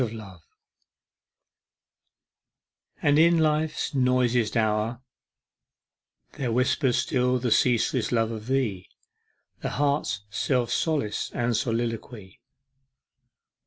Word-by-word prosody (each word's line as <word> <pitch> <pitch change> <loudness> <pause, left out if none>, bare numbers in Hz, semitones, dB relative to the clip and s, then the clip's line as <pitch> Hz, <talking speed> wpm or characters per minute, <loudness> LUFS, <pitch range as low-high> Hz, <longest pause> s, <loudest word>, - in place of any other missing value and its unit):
25 110 -6 -5 2.6
And 145 0 +4
in 170 +1 +5
Life's 155 -1 0
noisiest 125 -3 +1
hour 110 +2 0 1.4
There 125 -4 -1
whispers 125 +1 +1
still 125 -1 +1
the 120 -1 -2
ceaseless 120 -1 +2
love 115 -1 +1
of 110 0 -7
thee, 120 -9 -1 0.7
The - - -3
heart's 140 -8 0
self 120 +1 0
solace 145 -10 -1
} - - -22
and 120 -1 0
soliloquy. 115 -4 -3
120 Hz, 90 wpm, -26 LUFS, 110-135 Hz, 2.6 s, in